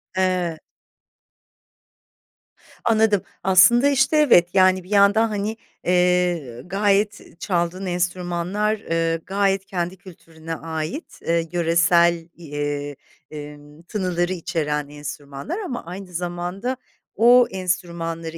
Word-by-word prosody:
Eee 185 Hz, -3 st, 0 dB, 2.3 s
Anladım. 220 Hz, -3 st, +3 dB, 0.2 s
Aslında, 195 Hz, +8 st, +6 dB
işte, 280 Hz, +2 st, +2 dB
evet. 180 Hz, -, +5 dB
Yani, 185 Hz, -1 st, +4 dB
bir 180 Hz, -, -17 dB
yandan 205 Hz, +2 st, +4 dB
hani, 210 Hz, +1 st, -3 dB, 0.3 s
eee, 180 Hz, -8 st, +1 dB
gayet 200 Hz, -1 st, 0 dB
çaldığın 180 Hz, +1 st, -1 dB
enstrümanlar, 180 Hz, +3 st, -1 dB
eee, 165 Hz, -3 st, -1 dB
gayet 195 Hz, 0 st, 0 dB
kendi 180 Hz, 0 st, -3 dB
kültürüne 165 Hz, -3 st, -9 dB
ait, 160 Hz, -, -6 dB
eee, 165 Hz, 0 st, 0 dB
yöresel, 170 Hz, 0 st, +3 dB
eee, 145 Hz, -2 st, -4 dB, 0.4 s
emm, 150 Hz, +1 st, -10 dB
tınıları 180 Hz, -1 st, -1 dB
içeren 155 Hz, -4 st, -2 dB
enstrümanlar 145 Hz, -, -7 dB
ama 260 Hz, -, -5 dB
aynı 180 Hz, +1 st, -9 dB
zamanda 175 Hz, +8 st, -3 dB, 0.4 s
o 245 Hz, +2 st, +6 dB
enstrümanları 170 Hz, -3 st, -3 dB
180 Hz, 100 wpm, -22 LUFS, 165-195 Hz, 2.3 s, Aslında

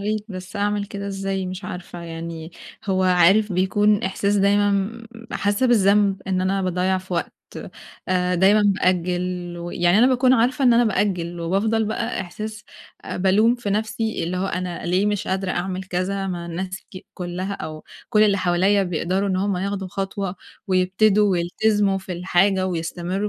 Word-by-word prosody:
ريت 210 Hz, +1 st, -2 dB
بس 185 Hz, 0 st, -8 dB
أعمل 205 Hz, 0 st, 0 dB
كده 200 Hz, 0 st, -6 dB
إزاي 195 Hz, -1 st, -3 dB
مش 185 Hz, +2 st, -6 dB
عارفة، 180 Hz, -1 st, -7 dB
يعني 165 Hz, -1 st, -7 dB, 0.3 s
هو 190 Hz, -2 st, +1 dB
عارف 185 Hz, +3 st, +4 dB
بيكون 205 Hz, +3 st, +2 dB
إحساس 200 Hz, +2 st, 0 dB
دايمًا 205 Hz, +1 st, +3 dB
م 200 Hz, +4 st, -2 dB, 0.3 s
حاسّة 205 Hz, +5 st, +1 dB
بالذنب 200 Hz, -3 st, +3 dB
إن 185 Hz, -1 st, 0 dB
أنا 190 Hz, +1 st, 0 dB
باضيّع 185 Hz, +1 st, 0 dB
في 185 Hz, 0 st, -10 dB
وقت، -, -, -2 dB, 0.8 s
آآ 180 Hz, 0 st, +1 dB
دايمًا 195 Hz, +4 st, +4 dB
بأجّل 180 Hz, -2 st, 0 dB
ويعني 175 Hz, +2 st, +1 dB
أنا 245 Hz, -, +6 dB
باكون 255 Hz, 0 st, +3 dB
عارفة 255 Hz, +2 st, +2 dB
إن 245 Hz, -, +6 dB
أنا 240 Hz, +1 st, +4 dB
بأجّل 180 Hz, -5 st, -1 dB
وبافضل 210 Hz, +6 st, +1 dB
بقى 225 Hz, +2 st, -2 dB
إحساس 210 Hz, +4 st, -7 dB, 0.4 s
آآ -, -, -5 dB
بالوم 200 Hz, +6 st, +3 dB
في 240 Hz, -4 st, -4 dB
نَفْسي 220 Hz, -1 st, -1 dB
اللي 180 Hz, +2 st, -3 dB
هو 190 Hz, -, -1 dB
أنا 180 Hz, -2 st, -4 dB
ليه 185 Hz, +4 st, +2 dB
مش 205 Hz, -2 st, -1 dB
قادرة 190 Hz, 0 st, -1 dB
أعمل 185 Hz, +1 st, -2 dB
كذا 190 Hz, +2 st, -2 dB
مع 175 Hz, -2 st, -4 dB
الناس 185 Hz, +3 st, -5 dB
ك 185 Hz, -, -5 dB, 0.2 s
كُلّها 180 Hz, +2 st, -4 dB
أو 155 Hz, -4 st, -7 dB, 0.2 s
كل 215 Hz, 0 st, +4 dB
اللي 200 Hz, -2 st, +3 dB
حوالي 190 Hz, +3 st, +2 dB
بيقدروا 185 Hz, +3 st, -1 dB
إن 185 Hz, -, 0 dB
هم 195 Hz, 0 st, 0 dB
ياخدوا 195 Hz, 0 st, -3 dB
خطوة 195 Hz, 0 st, -3 dB, 0.3 s
ويبتدوا 195 Hz, +2 st, +3 dB
ويلتزموا 195 Hz, +3 st, +1 dB
في 190 Hz, -1 st, -7 dB
الحاجة 185 Hz, +2 st, +2 dB
ويستمرّوا 180 Hz, +3 st, -3 dB
190 Hz, 165 wpm, -22 LUFS, 180-205 Hz, 0.8 s, أنا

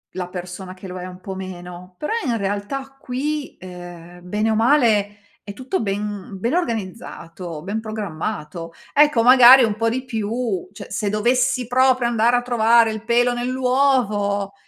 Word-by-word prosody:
la 180 Hz, -1 st, -3 dB
persona 180 Hz, +1 st, -7 dB
che 185 Hz, +1 st, -11 dB
lo 180 Hz, 0 st, -7 dB
è 180 Hz, -, -6 dB
un 185 Hz, 0 st, -10 dB
po' 190 Hz, 0 st, -6 dB
meno. 180 Hz, -1 st, -9 dB
Però 300 Hz, -, -2 dB
in 235 Hz, -4 st, 0 dB
realtà 205 Hz, +8 st, -4 dB
qui, 285 Hz, +4 st, -4 dB
ehm, 175 Hz, -1 st, -11 dB
bene 210 Hz, +4 st, 0 dB
o -, -, +1 dB
male 220 Hz, -4 st, +3 dB, 0.3 s
è 200 Hz, -, -8 dB
tutto 260 Hz, -, -3 dB
ben 205 Hz, -1 st, -4 dB
ben 235 Hz, +8 st, -1 dB
organizzato, 185 Hz, -, -4 dB
ben 200 Hz, +4 st, -3 dB
programmato. 175 Hz, -6 st, -5 dB, 0.2 s
Ecco 295 Hz, -6 st, +4 dB
magari 255 Hz, +1 st, +9 dB
un 215 Hz, -3 st, +1 dB
po' 230 Hz, +1 st, 0 dB
di 255 Hz, +3 st, -3 dB
più 225 Hz, -4 st, -3 dB
cioè, -, -, -10 dB
se 205 Hz, -2 st, -1 dB
dovessi 250 Hz, +3 st, +1 dB
proprio 255 Hz, 0 st, +3 dB
andare 235 Hz, +1 st, +2 dB
a -, -, 0 dB
trovare 235 Hz, -1 st, +3 dB
il 220 Hz, 0 st, -6 dB
pelo 245 Hz, +1 st, +2 dB
nell'uovo 245 Hz, -6 st, 0 dB
220 Hz, 160 wpm, -21 LUFS, 190-250 Hz, 0.3 s, magari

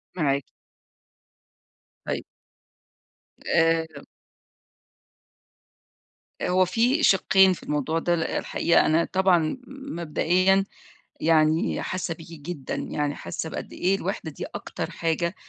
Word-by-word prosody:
معاكِ. 140 Hz, -5 st, 0 dB, 1.6 s
طيب. -, -, -3 dB, 1.2 s
آآ 160 Hz, -2 st, +1 dB, 2.4 s
هو 185 Hz, +1 st, +3 dB
في 240 Hz, -, +1 dB
شقّين 190 Hz, -3 st, +5 dB
في -, -, -10 dB
الموضوع 150 Hz, +2 st, -1 dB
ده، 175 Hz, +1 st, +1 dB
ل 165 Hz, -, -1 dB
الحقيقة 170 Hz, -, +1 dB
أنا 165 Hz, +2 st, +3 dB
طبعًا 185 Hz, 0 st, +3 dB
مبدئيًا 185 Hz, -, +1 dB, 0.6 s
يعني 160 Hz, +4 st, +2 dB
حاسة 185 Hz, -2 st, -3 dB
بيكِ 165 Hz, 0 st, -13 dB
جدًا، 145 Hz, -3 st, -5 dB
يعني 145 Hz, -1 st, -2 dB
حاسة 160 Hz, -, -5 dB
بقد -, -, -7 dB
إيه 190 Hz, +2 st, +1 dB
الوحدة 185 Hz, -4 st, -4 dB
دي -, -, -6 dB
أكتر -, -, -5 dB
حاجة 170 Hz, +2 st, -1 dB
170 Hz, 100 wpm, -25 LUFS, 160-190 Hz, 2.4 s, شقّين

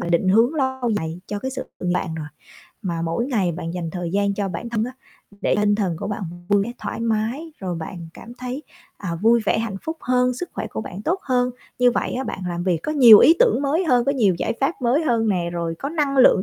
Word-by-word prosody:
là, 170 Hz, -, -3 dB
định 175 Hz, +2 st, +2 dB
hướng 230 Hz, +9 st, +4 dB
lâu 260 Hz, -4 st, 0 dB
dài 160 Hz, 0 st, -4 dB
cho 205 Hz, -, -4 dB
cái 260 Hz, +6 st, -4 dB
sự 260 Hz, 0 st, -4 dB, 0.2 s
nghiệp 180 Hz, -, -1 dB
bạn 165 Hz, -3 st, -2 dB
rồi, 155 Hz, -2 st, -5 dB, 0.6 s
mà 170 Hz, -3 st, -2 dB
mỗi 170 Hz, +9 st, -1 dB
ngày 200 Hz, -10 st, 0 dB
bạn 165 Hz, 0 st, -5 dB
dành 170 Hz, -3 st, -3 dB
thời 175 Hz, -1 st, -4 dB
gian 200 Hz, 0 st, +1 dB
cho 200 Hz, -1 st, -2 dB
bản 185 Hz, +7 st, -5 dB
thân 225 Hz, -1 st, 0 dB
á, 250 Hz, -, -6 dB, 0.5 s
để -, -, +1 dB
tinh 205 Hz, 0 st, +3 dB
thần 190 Hz, -5 st, -1 dB
của 200 Hz, -, -4 dB
bạn 205 Hz, 0 st, -4 dB, 0.3 s
vui 200 Hz, -1 st, +4 dB
vẻ 235 Hz, -, -5 dB
thoải -, -, -5 dB
mái, 230 Hz, +8 st, -1 dB
rồi 185 Hz, -3 st, -3 dB
bạn 165 Hz, +1 st, -7 dB
cảm 240 Hz, -, -11 dB
thấy, 255 Hz, +3 st, -5 dB, 0.4 s
à, 180 Hz, -4 st, -4 dB
vui 230 Hz, +1 st, +5 dB
vẻ -, -, +2 dB
hạnh 220 Hz, -3 st, -3 dB
phúc 320 Hz, +1 st, -4 dB
hơn, 250 Hz, 0 st, +2 dB
sức 355 Hz, +6 st, -6 dB
khỏe 215 Hz, +2 st, -4 dB
của 220 Hz, -, -5 dB
bạn 200 Hz, -2 st, -7 dB
tốt 365 Hz, -, 0 dB
hơn, 250 Hz, -1 st, +1 dB, 0.3 s
như 250 Hz, 0 st, +5 dB
vậy -, -, -1 dB
á 260 Hz, +2 st, -2 dB
bạn -, -, -5 dB
làm 175 Hz, 0 st, -3 dB
việc 180 Hz, -3 st, +1 dB
có 305 Hz, -, -2 dB
nhiều 240 Hz, -8 st, +9 dB
ý 325 Hz, -, +7 dB
tưởng 475 Hz, -, +3 dB
mới 315 Hz, +6 st, +1 dB
hơn, 245 Hz, -6 st, +3 dB
có 275 Hz, -, +2 dB
nhiều 210 Hz, -9 st, +3 dB
giải -, -, 0 dB
pháp 275 Hz, +4 st, +2 dB
mới 250 Hz, +7 st, +2 dB
hơn 230 Hz, -4 st, +1 dB
nè, 175 Hz, -4 st, 0 dB
rồi 170 Hz, -1 st, -2 dB
có 275 Hz, -, -3 dB
năng 295 Hz, -3 st, -1 dB
lượng 250 Hz, -7 st, +6 dB
225 Hz, 255 wpm, -22 LUFS, 180-260 Hz, 0.6 s, nhiều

